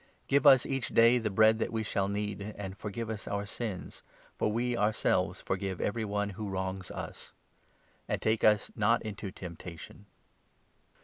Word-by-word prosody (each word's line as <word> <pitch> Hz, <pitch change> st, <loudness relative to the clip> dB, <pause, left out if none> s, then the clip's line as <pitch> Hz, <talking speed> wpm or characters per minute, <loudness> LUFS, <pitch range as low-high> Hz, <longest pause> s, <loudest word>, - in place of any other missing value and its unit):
Give 140 Hz, +2 st, +4 dB
us 130 Hz, -3 st, +8 dB
each 135 Hz, -3 st, -1 dB
day 115 Hz, +2 st, +5 dB
the 110 Hz, -2 st, -1 dB
bread 110 Hz, +2 st, +5 dB
3 -, -, -9 dB
that -, -, -11 dB
we 110 Hz, -1 st, -1 dB
shall 100 Hz, -2 st, 0 dB
need; 105 Hz, 0 st, -3 dB
And 95 Hz, -2 st, -5 dB
forgive 105 Hz, +2 st, -5 dB
us 110 Hz, -1 st, -5 dB
our 100 Hz, 0 st, -2 dB
sins, 105 Hz, -2 st, -5 dB, 0.4 s
4 -, -, +2 dB
for -, -, 0 dB
we 120 Hz, +2 st, 0 dB
ourselves 105 Hz, -1 st, +1 dB
forgive 95 Hz, -1 st, -3 dB
every 110 Hz, +1 st, -1 dB
one 105 Hz, 0 st, -1 dB
who 100 Hz, +1 st, -5 dB
wrongs 95 Hz, 0 st, -3 dB
us; -, -, -8 dB, 0.7 s
And -, -, -1 dB
take 110 Hz, 0 st, +1 dB
us 105 Hz, -1 st, +4 dB
not 115 Hz, +2 st, +2 dB
into 105 Hz, -2 st, -5 dB
temptation.'" 90 Hz, +1 st, -9 dB
105 Hz, 175 wpm, -31 LUFS, 100-115 Hz, 0.7 s, us